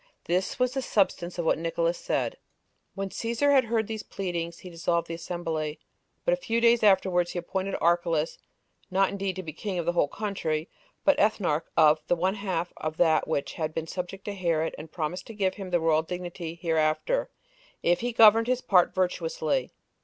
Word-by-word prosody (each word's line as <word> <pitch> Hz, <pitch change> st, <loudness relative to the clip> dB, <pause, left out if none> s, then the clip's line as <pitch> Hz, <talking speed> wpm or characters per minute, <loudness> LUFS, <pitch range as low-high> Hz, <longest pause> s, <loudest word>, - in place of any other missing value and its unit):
This 180 Hz, +2 st, -1 dB
was 250 Hz, 0 st, +1 dB
the 265 Hz, -, -1 dB
substance 185 Hz, -7 st, 0 dB
of 170 Hz, -, -2 dB
what 160 Hz, -, +2 dB
Nicolaus 170 Hz, +1 st, 0 dB
said. -, -, -1 dB
4. -, -, -25 dB, 0.6 s
When 195 Hz, -1 st, -3 dB
Cæsar 235 Hz, +8 st, 0 dB
had 265 Hz, -3 st, +5 dB
heard 225 Hz, -1 st, 0 dB
these 220 Hz, 0 st, -5 dB
pleadings, 170 Hz, -3 st, -4 dB
he 180 Hz, -, -10 dB
dissolved 170 Hz, 0 st, 0 dB
the 165 Hz, -, -5 dB
assembly; 165 Hz, -3 st, -3 dB, 0.5 s
but -, -, +3 dB
a -, -, +1 dB
few 230 Hz, -, -1 dB
days 235 Hz, 0 st, +5 dB
afterwards 190 Hz, -4 st, +3 dB
he -, -, -4 dB
appointed 190 Hz, +3 st, -2 dB
Archelaus, 170 Hz, -2 st, +1 dB, 0.5 s
not 195 Hz, 0 st, +3 dB
indeed 195 Hz, -1 st, -3 dB
to 185 Hz, -, -5 dB
be 155 Hz, -3 st, -7 dB
king 190 Hz, +3 st, -4 dB
of 170 Hz, -, -2 dB
the 175 Hz, -, +2 dB
whole 170 Hz, -4 st, +2 dB
country, 165 Hz, -4 st, -2 dB, 0.4 s
but 290 Hz, -, +4 dB
ethnarch 190 Hz, -7 st, +2 dB
of 155 Hz, 0 st, +6 dB
the -, -, +3 dB
one 185 Hz, +3 st, +1 dB
half 190 Hz, -4 st, -3 dB
of 155 Hz, 0 st, -4 dB
that 160 Hz, -3 st, +3 dB
which 140 Hz, -3 st, -2 dB
had 155 Hz, -1 st, -3 dB
been 165 Hz, -, -2 dB
subject 180 Hz, +3 st, -6 dB
to 205 Hz, -, -3 dB
Herod, 170 Hz, -4 st, 0 dB
and 155 Hz, +1 st, -10 dB
promised 175 Hz, +2 st, -4 dB
to 225 Hz, -, -9 dB
give 190 Hz, -2 st, +1 dB
him 195 Hz, -2 st, -7 dB
the 175 Hz, -1 st, +2 dB
royal 160 Hz, -1 st, +3 dB
dignity 175 Hz, 0 st, -6 dB
hereafter, 165 Hz, -, 0 dB, 0.5 s
if 175 Hz, 0 st, +3 dB
he 245 Hz, +1 st, -1 dB
governed 225 Hz, 0 st, +6 dB
his 255 Hz, 0 st, +1 dB
part 180 Hz, -3 st, +3 dB
virtuously. 485 Hz, -, 0 dB
180 Hz, 195 wpm, -27 LUFS, 165-205 Hz, 0.6 s, of